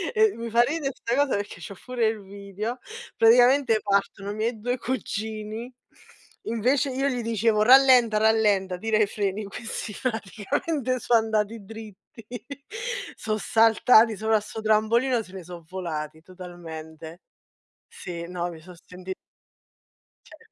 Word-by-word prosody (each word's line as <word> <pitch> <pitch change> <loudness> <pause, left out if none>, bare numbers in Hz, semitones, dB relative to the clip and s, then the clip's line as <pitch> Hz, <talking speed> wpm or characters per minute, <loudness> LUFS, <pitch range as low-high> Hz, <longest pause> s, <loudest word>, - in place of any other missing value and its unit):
e 435 -1 +4
mi 230 0 -5
fa 235 +2 +4
ridere 280 +1 -1
sta 235 - -2
cosa 285 -1 +2
perché 205 0 -5
c'ho 200 - -8
pure 245 -3 0
il 220 -2 -3
video. 200 +5 -6 0.4
Praticamente 245 0 +5
partono 200 0 -1
i - - -6
miei 225 +1 -2
2 245 +3 -2
cugini, 220 -1 -4 0.7
invece 255 +5 +1
io 270 +2 -1
gli 250 -3 -1
dicevo: 225 -1 +1
“Rallenta, 250 -2 +6
rallenta, 210 -4 +2
tira 220 +2 +1
i 215 - +4
freni.” 200 0 -3
Questi 210 +1 -6
praticamente 255 - -2
so' 240 - -2
andati 220 -1 +1
dritti, 220 +1 -12 0.9
so' 215 -1 -2
saltati 225 0 +4
sopra 220 +1 +2
sto 210 +1 -8
trampolino, 225 +3 +2
se 190 -3 -14
ne 190 - -8
so' 175 0 -10
volati 160 -4 -5
totalmente. 165 -2 -10 0.7
Sì, 170 -2 -7
no, 175 -1 -3
mi 165 -2 -11
son 180 +3 -13
senti 185 +1 -8 1.1
Cioè - - -15
220 Hz, 135 wpm, -25 LUFS, 195-235 Hz, 1.1 s, Rallenta